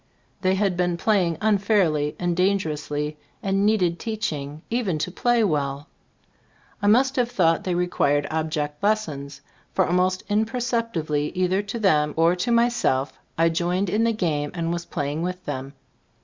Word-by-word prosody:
They 185 0 +2
had 195 -2 +1
been 175 -1 0
playing 180 -4 +1
unfairly 195 -8 +2
and 175 -1 -1
dangerously 155 -5 -1 0.3
and 195 +1 +2
needed 180 -6 +2
teaching, 155 -10 -4
even 225 -9 0
to 170 +4 -3
play 240 +3 +2
well. 145 -5 -1 0.9
I 205 - +1
must 260 +6 +4
have 245 -1 +2
thought 170 -9 +2
they 180 -2 0
required 145 -5 +1
ob 160 0 -1
ject 150 -1 -3
lessons, 150 -10 -1 0.3
for - - +3
almost 180 +1 +1
imperceptibly 220 - -1
either 185 +1 +2
to 205 +3 -5
them 150 -9 +2
or 165 +2 +4
to 180 +7 -1
myself, 235 - +2 0.2
I 165 +1 +4
joined 175 +3 0
in 215 +3 +2
the 230 - +3
game 155 -9 -1
and 170 -1 -1
was 170 0 -4
playing 145 +2 -3
with 180 +1 -4
them. 135 +1 -5
180 Hz, 155 wpm, -24 LUFS, 150-210 Hz, 0.9 s, must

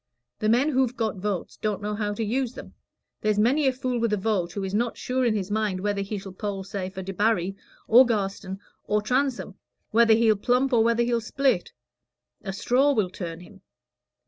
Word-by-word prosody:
The 215 - +1
men 250 +7 +3
who've 260 -3 +1
got 220 -3 -1
votes 195 -1 -3
don't 210 -2 -2
know 210 0 -3
how 210 -1 -2
to 225 - -2
use 250 +3 -1
them. - - -10 0.5
There's 215 -1 +1
many 265 +7 +3
a - - +4
fool 255 -1 -2
with 230 -1 0
a 210 - +2
vote, 190 -4 -1
who 200 - -3
is 190 0 -4
not 230 +3 0
sure 255 +1 -1
in 235 -3 +2
his 200 -1 -3
mind 210 -3 0
whether 205 0 -1
he 200 +2 -4
shall 195 0 -8
poll, 195 +1 -4
say 190 -1 -4
for 190 0 -7
Debarry, 195 -1 0 0.3
or 240 +3 +8
Garstin, 195 -4 -2 0.3
or 210 0 0
Transome 250 -3 -1 0.3
whether 225 0 +5
he'll 225 -1 +4
plump 250 +5 +1
or 225 -2 +5
whether 235 +1 +2
he'll 235 -1 0
split; 255 -4 0 0.7
a 195 - -4
straw 255 +8 +2
will 205 -7 0
turn 170 -3 -6
him. 195 +1 -15
215 Hz, 200 wpm, -25 LUFS, 195-240 Hz, 0.7 s, or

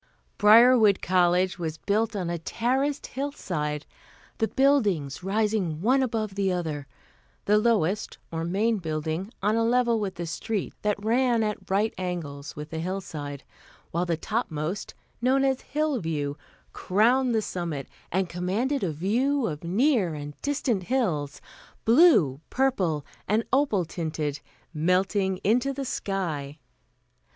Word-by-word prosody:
Briarwood 220 -1 +7
College 180 0 +2
was 160 -2 -3
built 215 +4 0
on 185 -4 -2
a 170 - -3
terraced 260 - -1
hillside, 170 - -3 0.5
the 220 - +2
buildings 205 - +2
rising 200 -4 0
one 255 +9 +3
above 220 -5 -1
the 195 -1 0
other, 155 -6 -3 0.6
the 210 +1 +4
lowest, 215 -3 +1
or 165 0 -3
Main 210 +7 +1
Building, 160 +4 -3
on 210 +2 +2
a 230 - +2
level 235 -1 +2
with 200 -3 -3
the 170 - -4
street 195 +5 -3
that 210 0 -1
ran 240 0 +3
at 210 -1 -4
right 205 +3 +1
angles 160 -6 -5
with 150 +1 -8
the 160 - -3
hillside, 160 -6 -5 0.5
while 175 +2 -1
the 165 -2 0
topmost, 175 -3 -3 0.3
known 265 +2 +3
as 265 -1 +1
"Hillview," 170 - -1 0.4
crowned 240 +6 +2
the 220 - +2
summit 165 -8 -4 0.2
and 190 +1 +1
commanded 200 +11 -1
a 175 - 0
view 235 - +1
of 150 -4 -4
near 200 - +2
and 145 0 -6
distant 275 -8 0
hills, 175 - -1 0.4
blue, 225 - +5
purple 190 - 0 0.2
and 215 +3 +2
opal 265 -10 +2
tinted, 155 -3 -3 0.3
melting 185 +4 +1
into 245 +6 +2
the 275 0 -4
sky. 160 - -3
195 Hz, 135 wpm, -26 LUFS, 165-235 Hz, 0.6 s, Briarwood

